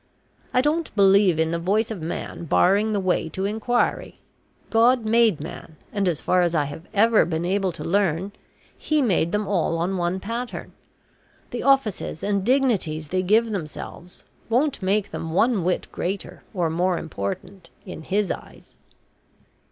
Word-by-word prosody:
I 250 - +3
don't 310 +4 0
believe 195 -3 +5
in 160 0 +1
the 170 - -1
voice 210 +6 0
of 200 -6 -5
man 165 +1 -5
barring 200 +7 +3
the 205 - 0
way 185 -3 0
to 190 +4 -3
inquiry. 220 +4 -1 0.5
God 235 +1 +4
made 225 -5 +3
man, 160 +1 -9 0.2
and, 200 -2 0
as 170 -5 0
far 180 - +2
as 175 -1 +1
I 150 - +3
have 145 +4 -8
ever 220 +2 +4
been 165 0 -2
able 190 0 0
to - - -8
learn, 190 0 0 0.4
He 305 -2 0
made 175 -7 +1
them 210 0 -1
all 175 -4 0
on 180 +3 -1
one 175 +1 -1
pattern. 235 +5 -5 0.8
The - - -3
offices 265 - +1
and 200 -1 0
dignities 205 - +1
they 185 0 0
give 220 +5 +3
themselves 175 -1 -7 0.3
won't 260 +4 +1
make 200 +2 0
them 160 -1 -5
one 220 0 +2
whit 180 +1 -1
greater 190 +2 -4
or 175 -5 -1
more 175 +2 +1
important 165 - -6 0.2
in - - -8
His 200 +4 0
eyes." - - -9
195 Hz, 160 wpm, -23 LUFS, 170-220 Hz, 0.8 s, believe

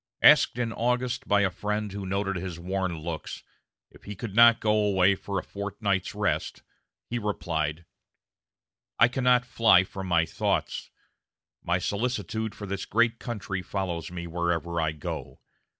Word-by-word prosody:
Asked - - +7
in 115 -2 -1
August 125 +1 -1
by 100 0 +4
a 95 -2 +2
friend 105 +2 -3
who 100 -1 -5
noted 100 +1 -1
his 90 -2 -5
worn 95 -1 -2
looks, 80 0 -6 0.5
if - - -19
he 105 - -6
could 105 0 -6
not 115 0 +7
go 105 - +1
away 100 -3 +3
for 100 +1 -4
a - - -2
fortnight's 100 -1 -2
rest, - - -1 0.4
he 120 - -3
replied: 85 -6 -2 1.1
"I 115 - +7
cannot 125 0 +2
fly 110 -7 +5
from 95 0 -7
my 85 -2 +3
thoughts - - -2 0.7
my 85 +1 +1
solicitude 110 +2 -2
for 105 - -7
this 100 0 -4
great 115 +1 +2
country 100 -6 -4
follows 90 -4 -3
me 85 -1 -5
wherever 85 0 -1
I 80 -1 +1
go. 75 - -6
100 Hz, 150 wpm, -27 LUFS, 90-110 Hz, 1.1 s, Asked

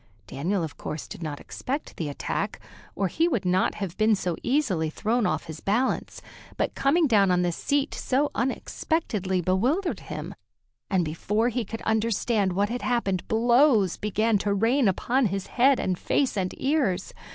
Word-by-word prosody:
Daniel, 170 - -2
of 155 - -6
course, 155 - -5
did - - -9
not 150 -3 -4
expect 280 +4 -5
the 155 -3 -2
attack, 140 - -3 0.4
or 195 - 0
he 325 - +1
would 240 - -1
not 185 +1 +2
have 195 -4 -4
been 215 0 +4
so 180 -3 -2
easily 225 - +1
thrown 220 +7 0
off - - -1
his 160 -2 -8
balance; 230 +9 -1 0.3
but - - 0
coming 315 +5 +3
down 205 -7 +4
on 180 0 +3
the 175 - +1
seat 280 - -1
so 280 +3 0
unexpectedly 220 - -1
bewildered 245 - +1
him, 155 +4 -7 0.6
and 185 -3 +2
before 210 +9 0
he 245 0 -1
could 225 +2 -7
understand 220 -2 +1
what 200 +3 +1
had 245 +1 -3
happened 200 -7 -1
blows 235 - +4
began 215 +1 +1
to 200 +1 -1
rain 230 +5 +3
upon 240 +6 +2
his 195 0 -3
head 265 +2 +3
and 185 -2 -1
face 275 -4 +1
and 185 -2 -2
ears. 265 - 0
210 Hz, 170 wpm, -26 LUFS, 185-250 Hz, 0.6 s, been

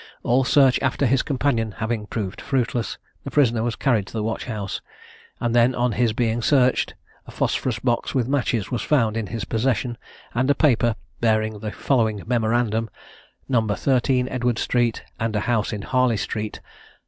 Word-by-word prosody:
All 130 +3 +3
search 130 -1 +4
after 130 +1 +1
his 130 +1 +3
companion 125 -6 0
having 110 -1 -3
proved 100 -4 -4
fruitless, 120 -5 -1 0.3
the - - -5
prisoner 120 -6 +3
was 115 0 -1
carried 115 -8 +1
to - - -12
the 110 -2 -2
watch 110 +1 -3
house, 105 -5 -4 0.6
and 120 0 0
then 120 +2 +4
on 125 0 +1
his 115 +1 +1
being 115 +1 0
searched, 130 0 +2 0.3
a - - -9
phosphorus 125 -4 -1
box 120 +4 -1
with 125 -3 +1
matches 125 -7 0
was 120 - -1
found 115 -7 +2
in 115 -2 -2
his 115 0 -4
possession, 120 0 -1 0.3
and 130 +3 +1
a 145 - +4
paper 120 -6 +3 0.2
bearing 110 -2 +1
the 105 0 -4
following 110 -7 0
memorandum: 115 -1 +1 0.6
"No 125 -4 +3
13, 125 +4 +1
Edward 125 -2 -1
street, 120 -2 0 0.2
and 115 -1 -1
a 105 - +1
house 115 -1 0
in 105 -3 -4
Harley 125 -2 +2
street; 105 +1 -4
No. - - -28
120 Hz, 175 wpm, -23 LUFS, 110-125 Hz, 0.6 s, search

